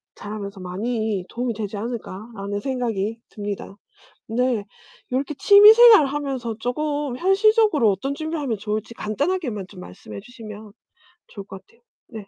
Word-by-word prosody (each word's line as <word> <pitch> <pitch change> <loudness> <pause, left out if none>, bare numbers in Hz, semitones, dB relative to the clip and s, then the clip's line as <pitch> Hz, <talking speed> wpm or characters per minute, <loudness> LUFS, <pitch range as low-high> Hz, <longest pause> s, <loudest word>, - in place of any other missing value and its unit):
자라면서 205 -1 -7
많이 205 +1 -3
도움이 240 0 -2
되지 205 -1 -5
않을까.'라는 205 -2 -5
생각이 225 -3 -2
듭니다. 205 -1 -6 0.5
네. 235 -2 0 0.5
이렇게 275 +4 -1
취미 410 +1 +9
생활을 450 - +8
하면서 270 -5 -3
쪼금 290 +1 -2
현실적으로 390 - +3
어떤 270 +9 -3
준비를 315 0 -4
하면 235 -6 -2
좋을지 215 +2 -4
간단하게만 240 - -2
좀 185 - -13
말씀해 100 - -10
주시면 215 -4 -11 0.6
좋을 200 -2 -10
것 190 - -10
같아요. 230 +5 -29 0.3
네. 220 -4 -10
230 Hz, 340 characters per minute, -22 LUFS, 205-280 Hz, 0.6 s, 취미